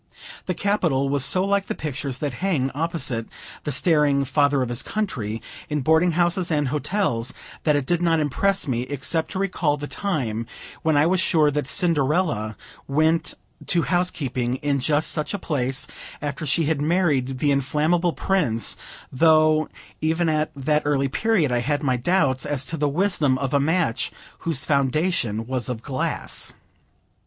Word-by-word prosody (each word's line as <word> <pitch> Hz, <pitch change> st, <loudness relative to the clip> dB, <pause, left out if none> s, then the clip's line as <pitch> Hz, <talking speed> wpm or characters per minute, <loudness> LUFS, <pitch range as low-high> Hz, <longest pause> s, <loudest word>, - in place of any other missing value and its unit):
The 185 Hz, -, -1 dB
Capitol 165 Hz, -10 st, +1 dB
was 140 Hz, -1 st, +1 dB
so 185 Hz, +7 st, +2 dB
like 200 Hz, 0 st, +1 dB
the -, -, -3 dB
pictures 140 Hz, -3 st, -4 dB
that 145 Hz, -3 st, -3 dB
hang 150 Hz, -9 st, +1 dB
opposite 140 Hz, -7 st, -2 dB, 0.4 s
the 150 Hz, -, -1 dB
staring 145 Hz, -1 st, +3 dB
Father 140 Hz, 0 st, +2 dB
of 125 Hz, -, -4 dB
his 120 Hz, +1 st, -1 dB
Country, 115 Hz, -, -3 dB, 0.3 s
in 150 Hz, -1 st, -1 dB
boarding 160 Hz, +5 st, +3 dB
houses 175 Hz, +1 st, +1 dB
and 150 Hz, -4 st, +1 dB
hotels, 140 Hz, -, -1 dB, 0.3 s
that 150 Hz, -2 st, +4 dB
it 145 Hz, -2 st, 0 dB
did 175 Hz, +3 st, +1 dB
not 165 Hz, -2 st, +3 dB
impress 180 Hz, +6 st, +1 dB
me, 120 Hz, -3 st, 0 dB
except 140 Hz, +5 st, -1 dB
to -, -, -5 dB
recall 180 Hz, -6 st, 0 dB
the 145 Hz, -, -5 dB
time 125 Hz, -, -2 dB, 0.3 s
when 160 Hz, -2 st, +2 dB
I 145 Hz, -, +5 dB
was 185 Hz, +2 st, +2 dB
sure 155 Hz, -4 st, +3 dB
that 145 Hz, -2 st, -2 dB
Cinderella 150 Hz, -, +1 dB, 0.3 s
went 155 Hz, +4 st, +1 dB, 0.3 s
to 170 Hz, -2 st, +4 dB
housekeeping 135 Hz, -9 st, 0 dB
in 140 Hz, 0 st, -1 dB
just 150 Hz, +3 st, +1 dB
such 155 Hz, +5 st, -2 dB
a -, -, -1 dB
place, 135 Hz, -7 st, -2 dB, 0.3 s
after 145 Hz, +2 st, -4 dB
she 165 Hz, +5 st, +2 dB
had 150 Hz, -1 st, 0 dB
married 145 Hz, -6 st, +1 dB
the 145 Hz, +2 st, +2 dB
inflammable 155 Hz, +5 st, +1 dB
Prince; 150 Hz, -13 st, 0 dB, 0.3 s
though, 155 Hz, +1 st, +4 dB, 0.3 s
even 160 Hz, +2 st, +1 dB
at 155 Hz, 0 st, +1 dB
that 150 Hz, +2 st, +1 dB
early 140 Hz, -2 st, +1 dB
period, 190 Hz, -, +1 dB
I 120 Hz, -, +2 dB
had 145 Hz, +4 st, -1 dB
my 130 Hz, -3 st, +2 dB
doubts 135 Hz, 0 st, +1 dB
as 145 Hz, -3 st, -2 dB
to 165 Hz, -, -3 dB
the 150 Hz, -1 st, +1 dB
wisdom 155 Hz, -5 st, +1 dB
of 135 Hz, +1 st, -3 dB
a 140 Hz, -, +4 dB
match 160 Hz, -3 st, +1 dB, 0.3 s
whose 160 Hz, -5 st, 0 dB
foundation 140 Hz, -, +1 dB
was 130 Hz, 0 st, -3 dB
of 115 Hz, -2 st, -4 dB
glass. 130 Hz, -2 st, -1 dB
150 Hz, 165 wpm, -23 LUFS, 135-170 Hz, 0.4 s, I